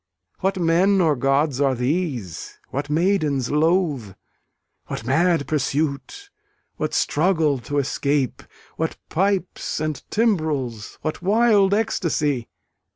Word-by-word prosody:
What 190 +1 0
men 180 +4 +3
or 160 -5 +3
gods 135 +1 +1
are 135 -2 +3
these? 125 - -3
what 140 +2 -4
maidens 155 -6 +1
loath? 150 - +1 0.7
What 110 - -5
mad 160 +2 +2
pursuit? 150 - -2 0.5
What - - -2
struggle 155 -4 +2
to 145 +5 -4
escape? 140 -1 0 0.4
What - - -2
pipes 190 -1 -1
and 155 -3 -2
timbrels? 155 - -1
What 155 +2 -3
wild 205 0 +4
ecstasy? 150 - 0
155 Hz, 105 wpm, -22 LUFS, 135-185 Hz, 0.7 s, wild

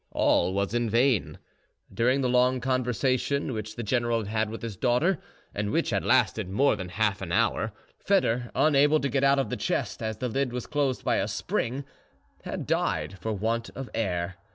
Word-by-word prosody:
All 95 - +2
was 100 +2 -1
in 120 -1 0
vain. 115 - +2 0.6
During 125 +4 +2
the 130 - +1
long 125 +1 +3
conversation 130 +2 0
which 110 0 -5
the 120 - -4
general 120 +1 +1
had 105 - -6
had 110 0 0
with 115 +1 -7
his 115 -3 -4
daughter, 130 - +2 0.3
and 105 0 -2
which - - 0
had - - 0
lasted - - +2
more 120 +6 +3
than 95 -3 -6
half 100 +1 0
an 90 -3 -5
hour, - - +1 0.3
Foedor, 125 - +1
unable 150 0 +4
to 140 - -1
get 135 0 0
out 140 0 +5
of 135 - -1
the 125 - -2
chest, 105 - -2
as 110 -1 -3
the 125 - -2
lid 130 +1 -1
was 125 -1 -4
closed 140 -4 -1
by - - +2
a - - 0
spring, 130 +4 -2 0.6
had - - -4
died 95 - -1
for 110 - -3
want 115 +3 -1
of 135 -1 -7
air. 90 -4 -2
120 Hz, 195 wpm, -27 LUFS, 105-130 Hz, 0.6 s, out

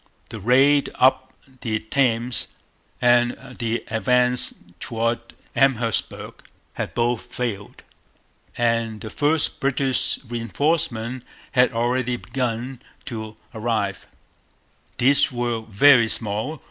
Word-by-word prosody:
The 110 -1 -7
raid 135 +6 +4
up 130 0 +3 0.3
the 110 -2 -1
Thames 120 +1 0 0.5
and 120 0 +4 0.3
the 115 0 -1
advance 125 +2 +2 0.3
towards 115 0 -2 0.2
Amherstburg 120 -6 0 0.3
had - - -5
both 120 -1 +1
failed. 110 -5 -5 0.7
And 115 -2 0
the 110 - -7
first 150 +1 +1
British 135 -1 +1
reinforcements 120 0 -1 0.3
had 125 0 +4
already 125 +1 0
begun 125 +1 -3 0.2
to 110 -2 -6 0.2
arrive. 110 -3 -2 0.9
These 140 +4 +4
were 120 -2 -2
very 115 +2 +5
small. 110 +9 -2
120 Hz, 95 wpm, -23 LUFS, 115-130 Hz, 0.9 s, very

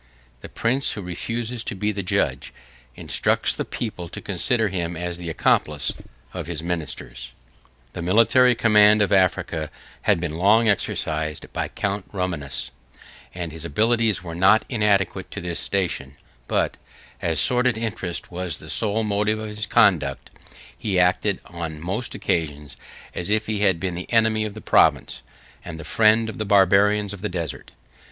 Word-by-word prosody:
The - - -10
prince 130 +4 0
who 105 - -6
refuses 115 +6 -4
to - - -3
be 105 +3 -1
the 100 -1 -3
judge, 90 - -1 0.4
instructs - - 0
the - - -2
people 95 -7 -5
to - - -7
consider 115 -4 0
him 85 -3 -3
as 90 0 -4
the 85 -1 -5
accomplice, 75 -2 +1 0.4
of - - -5
his 85 -2 -4
ministers. 65 -7 -5 0.6
The - - -5
military 115 +7 +4
command 105 -2 +5
of 100 - 0
Africa 85 -4 +1 0.3
had - - +2
been 80 -1 -4
long 110 +5 +4
exercised 75 -6 -2
by - - -2
Count 100 -1 -3
Romanus, 90 -8 -3 0.6
and 85 -2 -4
his 80 0 -8
abilities 110 +4 +1
were 85 -2 -6
not 95 +6 +4
inadequate 100 -5 +1
to 100 - -6
his 85 -1 -4
station; 85 -8 -2 0.3
but, - - 0 0.4
as 80 -2 0
sordid 125 -2 +3
interest 100 -7 -4
was 90 -3 -3
the - - -8
sole 110 +1 +2
motive 105 +1 0
of 110 0 -5
his 105 0 -5
conduct, 85 - +2 0.4
he 95 - -1
acted, 90 +2 +2
on 85 -3 -6
most 95 +9 -3
occasions, 75 -3 -2 0.4
as 85 - -3
if 110 +1 +1
he 110 -1 -2
had 95 -5 +2
been 90 +1 -2
the 90 +1 -7
enemy 110 -2 +3
of 105 -1 -6
the 110 - -8
province, - - +3 0.4
and 80 -2 -8
the - - -7
friend 110 +6 +3
of 110 - -7
the - - 0
Barbarians 100 +1 +4
of 100 - -9
the 105 - -2
desert. 85 -4 -5
95 Hz, 160 wpm, -23 LUFS, 85-110 Hz, 0.6 s, command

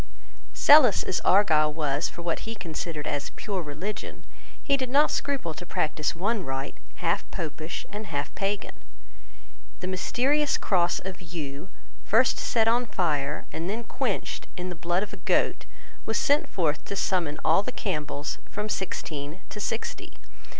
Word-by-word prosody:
Zealous 280 -8 +7
as 185 - 0
Argyle 155 -6 +5
was 150 0 0
for 170 - -9
what 170 -1 0
he 225 0 -5
considered 165 -4 -4
as 145 -1 -2
pure 195 -3 -2
religion, 175 +7 -5 0.4
he 280 - +4
did 260 -2 -2
not 285 +4 +5
scruple 275 - -1
to 160 +3 -8
practice 155 -2 0
one 205 +4 0
rite 135 -1 -3 0.2
half - - 0
Popish 155 0 -4
and 210 +1 -5
half 145 -4 -3
Pagan. 200 +1 -2 1.1
The - - -4
mysterious 260 +10 +2
cross 175 -3 +2
of 190 0 -6
yew, 165 -2 -6 0.3
first 235 +4 +4
set 225 -2 +2
on 240 +2 +3
fire, 150 -7 0
and 165 +3 -3
then 225 +4 -2
quenched 230 -2 -2
in 180 0 -3
the 180 - -4
blood 175 +3 0
of 210 - -7
a - - -6
goat, - - +1 0.4
was 225 - +1
sent 300 0 +3
forth 160 -5 0
to 200 - -4
summon 175 -6 0
all 165 +4 +5
the 230 - -4
Campbells, 150 -9 -3
from 210 +1 -3
sixteen 155 -4 -3
to 210 - -7
sixty. 225 +2 -3
185 Hz, 155 wpm, -27 LUFS, 155-220 Hz, 1.1 s, Zealous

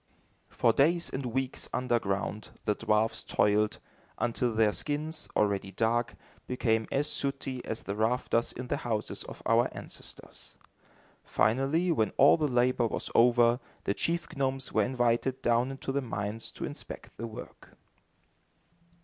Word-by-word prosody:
For 115 - +3
days 170 +7 +3
and 130 -1 -3
weeks 130 +2 -2
underground, 110 -4 -1 0.2
the 105 - +3
dwarfs 105 +2 +1
toiled, 105 +1 +2 0.4
until 120 0 0
their 110 -1 +4
skins, 155 +5 -2
already 100 -2 +1
dark, 115 +4 0 0.3
became 115 -3 +1
as 145 +2 +1
sooty 135 -3 -2
as 110 - -4
the 100 - -3
rafters 115 +1 +1
in 125 - -6
the - - -1
houses 110 -3 -2
of - - -10
our - - +4
ancestors. - - -10 0.7
Finally, 140 +10 +2
when 110 -10 +1
all 140 - +7
the 155 -2 +1
labor 125 -2 +2
was - - -4
over, 120 0 +5 0.2
the 100 - +1
chief 170 +6 -2
gnomes 135 -1 -1
were - - +4
invited 125 +1 +1
down 120 +2 +3
into 135 0 -4
the 140 +1 0
mines 110 -2 -4
to - - -4
inspect - - -8
the 115 - -4
work. 110 - -11
120 Hz, 140 wpm, -30 LUFS, 110-135 Hz, 0.7 s, all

